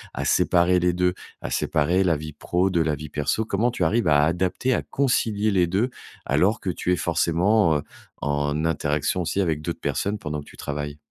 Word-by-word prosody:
à -, -, -3 dB
séparer 90 Hz, +1 st, +3 dB
les 90 Hz, 0 st, +2 dB
2? 90 Hz, 0 st, +1 dB, 0.3 s
À -, -, -5 dB
séparer 85 Hz, +5 st, +1 dB
la 85 Hz, -4 st, +2 dB
vie 75 Hz, 0 st, -7 dB
pro 90 Hz, +5 st, 0 dB
de 85 Hz, -2 st, +2 dB
la 80 Hz, -2 st, 0 dB
vie 75 Hz, +1 st, -8 dB
perso? 75 Hz, +10 st, -1 dB
Comment 110 Hz, +3 st, +1 dB
tu 105 Hz, -, -2 dB
arrives 115 Hz, +8 st, +1 dB
à 75 Hz, -1 st, +5 dB
adapter, 90 Hz, +10 st, 0 dB
à -, -, 0 dB
concilier 110 Hz, -6 st, 0 dB
les 90 Hz, -3 st, +3 dB
2 100 Hz, +8 st, 0 dB, 0.4 s
alors 90 Hz, -, +2 dB
que 95 Hz, -, -3 dB
tu 90 Hz, -, -2 dB
es -, -, +3 dB
forcément 85 Hz, +1 st, +2 dB, 0.4 s
en 75 Hz, +2 st, -1 dB
interaction 75 Hz, +1 st, 0 dB
aussi 90 Hz, +3 st, -2 dB
avec 80 Hz, -5 st, -1 dB
d'autres 85 Hz, +2 st, -4 dB
personnes 105 Hz, +2 st, -1 dB
pendant 75 Hz, -3 st, -4 dB
que 70 Hz, -, -15 dB
tu -, -, -16 dB
travailles? 75 Hz, 0 st, -5 dB
85 Hz, 200 wpm, -24 LUFS, 75-95 Hz, 0.4 s, à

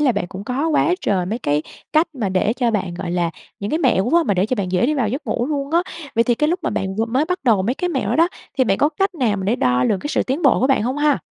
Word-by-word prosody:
là 275 Hz, -5 st, +3 dB
bạn 175 Hz, -, -2 dB
cũng 195 Hz, +2 st, -8 dB
có 275 Hz, +7 st, -1 dB
quá 325 Hz, +3 st, +2 dB
trời 185 Hz, -3 st, 0 dB
mấy 220 Hz, +5 st, -2 dB
cái 150 Hz, -8 st, 0 dB, 0.3 s
cách 320 Hz, +1 st, +2 dB
mà 225 Hz, -7 st, -2 dB
để 190 Hz, +3 st, +1 dB
cho 240 Hz, -1 st, 0 dB
bạn 185 Hz, -5 st, -2 dB
gọi 175 Hz, -1 st, -5 dB
là, 175 Hz, -2 st, 0 dB, 0.3 s
những 200 Hz, -, -3 dB
cái 315 Hz, -, +1 dB
mẹo 190 Hz, -, +2 dB
quá 335 Hz, +7 st, +3 dB
mà 205 Hz, -, 0 dB
để 185 Hz, +3 st, +1 dB
cho 255 Hz, -, 0 dB
bạn 185 Hz, -2 st, -3 dB
dễ 185 Hz, +6 st, +2 dB
đi 305 Hz, -, +1 dB
vào 240 Hz, -7 st, 0 dB
giấc 275 Hz, +6 st, -4 dB
ngủ 240 Hz, -, -1 dB
luôn 285 Hz, -1 st, -3 dB
á. 340 Hz, +2 st, +3 dB, 0.3 s
Vậy 230 Hz, 0 st, +3 dB
thì 240 Hz, -, +2 dB
cái 300 Hz, +5 st, +1 dB
lúc 355 Hz, +3 st, 0 dB
mà -, -, -1 dB
bạn 190 Hz, 0 st, -2 dB
vừa 225 Hz, -, +1 dB
mới 255 Hz, +6 st, 0 dB
bắt 360 Hz, +2 st, -2 dB
đầu 215 Hz, -6 st, +3 dB
mấy 240 Hz, +6 st, 0 dB
cái 360 Hz, -, -2 dB
mẹo 345 Hz, -, -1 dB
đó -, -, +1 dB
đó, 335 Hz, +2 st, +4 dB, 0.3 s
thì 260 Hz, -, +5 dB
bạn 195 Hz, -4 st, +1 dB
có 290 Hz, -, +4 dB
cách 385 Hz, +5 st, -1 dB
nào 235 Hz, -10 st, +1 dB
mà 190 Hz, -, -4 dB
để 220 Hz, +5 st, +1 dB
đo 125 Hz, 0 st, +2 dB
lường 200 Hz, -, +1 dB
cái 290 Hz, -, -4 dB
sự -, -, +1 dB
tiến 275 Hz, +6 st, -2 dB
bộ 275 Hz, -, +4 dB
của 260 Hz, -, +3 dB
bạn 270 Hz, -6 st, +2 dB
hông 255 Hz, +4 st, -1 dB
ha? 295 Hz, -2 st, +3 dB
245 Hz, 330 wpm, -20 LUFS, 195-300 Hz, 0.3 s, thì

